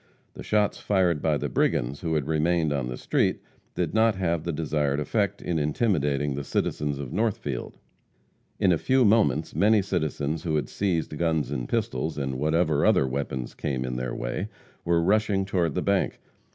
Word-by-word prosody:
The - - -9
shots 105 -1 +1
fired 90 -6 +1
by 75 -2 +2
the - - -2
brigands 60 +4 0
who 80 -2 -1
had 75 -3 0
remained 80 0 +1
on 70 -4 -1
the 60 - -5
street - - +1 0.4
did 85 -3 -1
not 110 -1 +3
have 85 -4 -1
the 85 - -2
desired 75 -2 0
effect 100 +5 -1
in 85 -2 -1
intimidating 75 - +1
the 70 +1 -4
citizens 75 +1 -1
of 70 -3 -6
Northfield. 95 - -2 0.8
In 95 -3 +4
a 85 - +2
few 130 -1 +3
moments 105 -7 +3
many 105 0 +4
citizens 80 -4 -2
who 80 -3 -1
had 75 - -1
seized 85 -6 -1
guns 80 -5 0
and 60 -1 -3
pistols, 110 -9 -1
and 65 -2 -2
whatever 80 0 +2
other - - +4
weapons 65 -2 -3
came 65 -3 -3
in 60 -1 -3
their 65 0 -3
way, - - -3 0.4
were 85 -1 +2
rushing 100 0 +2
toward 90 -4 0
the 90 - 0
bank. 100 -1 0
80 Hz, 180 wpm, -26 LUFS, 70-95 Hz, 0.8 s, In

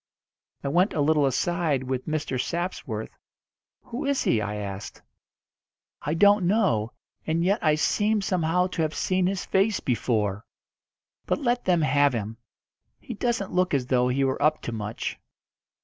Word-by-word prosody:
I - - -2
went 180 +8 +2
a - - -1
little 150 -1 +3
aside 155 0 0
with 130 0 -3
Mr. 150 -5 -1
Sapsworth. 175 +6 -4 0.7
"Who 245 +4 -5
is 280 -1 +1
he?" 110 - +2
I 105 0 -3
asked. 100 -1 -6 1.0
"I 150 +2 -2
don't 205 0 +5
know, 175 - +1 0.3
and 165 +1 +1
yet 200 +5 +1
I 155 -2 +4
seem 210 +7 +1
somehow 180 -2 +1
to 180 -2 -3
have 155 -1 -1
seen 185 -1 +1
his 190 0 -2
face 195 +2 +2
before. 110 -5 -1 0.8
But - - +1
let 245 -3 0
them 175 -3 +3
have 145 -2 +3
him. 110 -1 -4 0.6
He 240 - -7
doesn't 230 -2 -2
look 180 -4 +2
as 130 -3 0
though 125 -1 +2
he 130 +2 +1
were 135 +1 0
up 155 +1 +2
to - - -4
much." 110 0 -4
155 Hz, 160 wpm, -26 LUFS, 125-185 Hz, 1.0 s, don't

